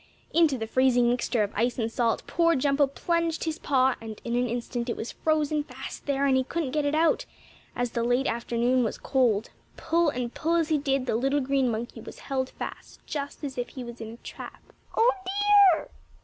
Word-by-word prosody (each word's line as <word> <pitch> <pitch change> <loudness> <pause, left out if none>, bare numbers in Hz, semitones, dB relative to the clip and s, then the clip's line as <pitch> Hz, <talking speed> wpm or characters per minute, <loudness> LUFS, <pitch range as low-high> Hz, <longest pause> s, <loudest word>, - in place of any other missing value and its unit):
Into 320 -5 +4
the 225 - -3
freezing 245 +1 +3
mixture 240 -2 +1
of 205 - -4
ice 235 +3 0
and 225 -2 -1
salt 230 -1 0
poor 335 0 +2
Jumpo 280 +1 +2
plunged 335 +3 -1
his 320 -1 -3
paw, 265 -2 +3
and 220 -2 -8
in 235 0 -1
an 245 +1 +1
instant 240 +1 -3
it - - -2
was 225 - -5
frozen 305 -1 0
fast - - -9
there, 280 0 +1
and 270 -1 +3
he 260 - +3
couldn't 295 0 -3
get 300 0 0
it 290 +1 +1
out, 325 +1 +2 0.5
as 245 -1 -1
the 235 - -1
late 245 +3 +2
afternoon 235 +2 +1
was 220 - -2
cold. 235 -6 +1 0.3
Pull 330 0 +2
and 245 -3 -3
pull 330 +2 0
as 330 -2 +1
he 310 -2 +2
did, 275 -2 0
the - - -1
little 270 +5 +1
green 270 -1 +1
monkey 230 +1 -4
was - - -10
held 260 -1 -2
fast, - - -9
just 285 0 -5
as 265 -3 -4
if 245 - -2
he 260 - -7
was 235 -1 -9
in 225 0 -6
a - - -23
trap. - - -10 0.2
"Oh, 470 +2 +6
dear! 400 -2 +4
265 Hz, 210 wpm, -27 LUFS, 240-310 Hz, 0.5 s, Oh